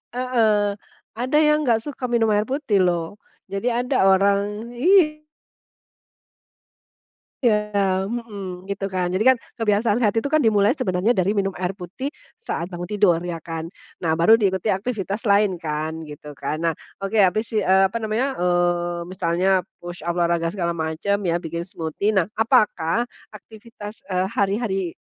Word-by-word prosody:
Heeh. 220 -5 +2 0.4
Ada 255 +4 -1
yang 300 -2 +3
nggak 225 -1 +2
suka 265 -4 -5
minum 230 -2 +2
air 210 +1 +2
putih 265 -7 0
loh. 175 +2 0 0.3
Jadi 195 +5 -3
ada 245 -4 +2
orang 200 +4 +2
iy 305 -1 +3 2.2
Iya, 205 -4 +1
mhm, 200 -5 -6
gitu 195 0 -3
kan. 180 -1 0
Jadi 190 +6 0
kan 260 -1 +6 0.2
kebiasaan 215 0 +2
sehat 220 -4 +2
itu 230 +5 -1
kan 310 - +3
dimulai 210 +4 +3
sebenarnya 185 -3 0
dari 190 +3 +2
minum 195 -2 0
air 180 +1 -2
putih 200 - -6 0.3
saat 170 +2 -3
bangun 175 -1 -6
tidur 200 -4 +3
ya 165 -2 -4
kan? 165 -1 -5 0.3
Nah, 160 -3 0
baru 170 +8 +5
diikuti 195 -1 0
aktivitas 205 +1 -2
lain 200 -2 +3
kan, 160 0 -4
gitu 150 -1 -10
kan. 155 +1 -3
Nah, 165 -1 +1 0.3
oke. 195 +3 -2
Habis 215 +3 +2
i 205 - +1
eee, 190 +1 +4
apa 230 - -3
namanya, 230 +5 -1
eee, 175 -1 +1
misalnya 185 0 +1 0.2
push 175 0 -8
up, 170 - 0
olahraga 170 0 +1
segala 175 -4 -1
macam 160 +5 -1
ya, 170 0 +1
bikin 170 0 -5
smoothie, 180 +5 -2
nah, 190 -1 +1
apakah 225 -3 +2 0.2
aktivitas, 215 0 -11
eee, 185 -1 -1
hari-hari 195 -3 -1
200 Hz, 155 wpm, -22 LUFS, 175-225 Hz, 2.2 s, kan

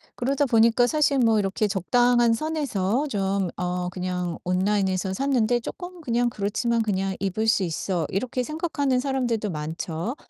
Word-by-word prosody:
그러다 275 +3 0
보니까 235 0 +4
사실 295 -2 +2
뭐 225 -3 +4
이렇게 200 +2 0
적당한 240 +5 +3
선에서 280 -4 -1
좀 195 -5 -1
어 180 0 -2
그냥 180 -2 -3
온라인에서 190 0 0
샀는데 245 -1 +1
'쪼끔 355 +8 -8
그냥 240 -3 +1
그렇지만 230 +2 -1
그냥 195 -3 -1
입을 200 +3 -1
수 220 -3 +3
있어.' 170 0 -2
이렇게 250 +5 -2
생각하는 290 -3 -1
사람들도 245 -6 -1
많죠. 165 - -4
220 Hz, 340 characters per minute, -25 LUFS, 190-250 Hz, -, 보니까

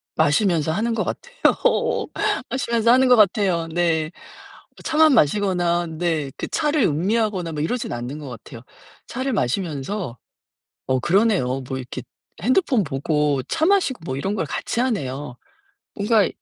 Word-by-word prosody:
마시면서 160 -1 +2
하는 225 +6 0
것 220 - 0
같아요. 485 0 0 0.4
마시면서 235 -3 +1
하는 260 +1 +5
것 250 - +7
같아요. 195 -5 +2
네. 165 -1 0 0.7
뭐 - - -14
차만 315 -2 +4
마시거나 175 - +2
네 160 -3 -2
그 - - -4
차를 300 -2 +1
음미하거나 185 +2 0
뭐 150 - -3
이러진 245 +7 -2
않는 120 +5 -5
것 145 - -8
같아요. 115 0 -10 0.5
차를 260 +2 -3
마시면서 155 - -2 0.7
어 130 0 +1
그러네요. 175 - +2
뭐 130 - -3
이렇게 130 0 -6 0.4
핸드폰 255 - +2
보고 145 -1 0
차 320 0 +1
마시고 370 - +2
뭐 130 -4 -3
이런 195 +8 -2
걸 175 - -1
같이 190 - -3
하네요. 145 - -3 0.6
뭔가 210 0 +3
175 Hz, 300 characters per minute, -22 LUFS, 145-230 Hz, 0.7 s, 것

